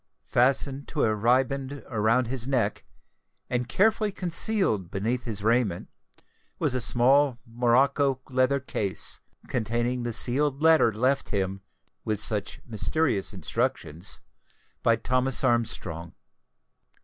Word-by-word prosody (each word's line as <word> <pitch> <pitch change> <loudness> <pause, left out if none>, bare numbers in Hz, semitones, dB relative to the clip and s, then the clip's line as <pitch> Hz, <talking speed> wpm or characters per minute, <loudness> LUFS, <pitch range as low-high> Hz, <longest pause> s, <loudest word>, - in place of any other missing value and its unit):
Fastened 135 +2 +1
to - - -2
a 110 - +2
riband 130 +5 0
round 115 +3 +2
his 125 0 -2
neck, 120 -7 -1 0.7
and 125 -1 -2
carefully 215 - +2
concealed 180 - +1
beneath 115 +6 -2
his 105 -4 -3
raiment, 115 -5 0 0.7
was - - 0
a 125 - 0
small 130 +2 +3
morocco 130 +3 +1
leather 130 +2 +2
case, 100 -7 0 0.3
containing 120 +2 -2
the 120 0 -3
sealed 135 +5 +1
letter 160 -7 +5
left 130 +6 0
him, 95 -1 -2 0.4
with 105 -2 -2
such 105 -2 0
mysterious 120 0 0
instructions, 95 - -3 0.6
by - - +3
Thomas 130 0 +1
Armstrong. 90 -8 -1
125 Hz, 115 wpm, -26 LUFS, 110-135 Hz, 0.7 s, letter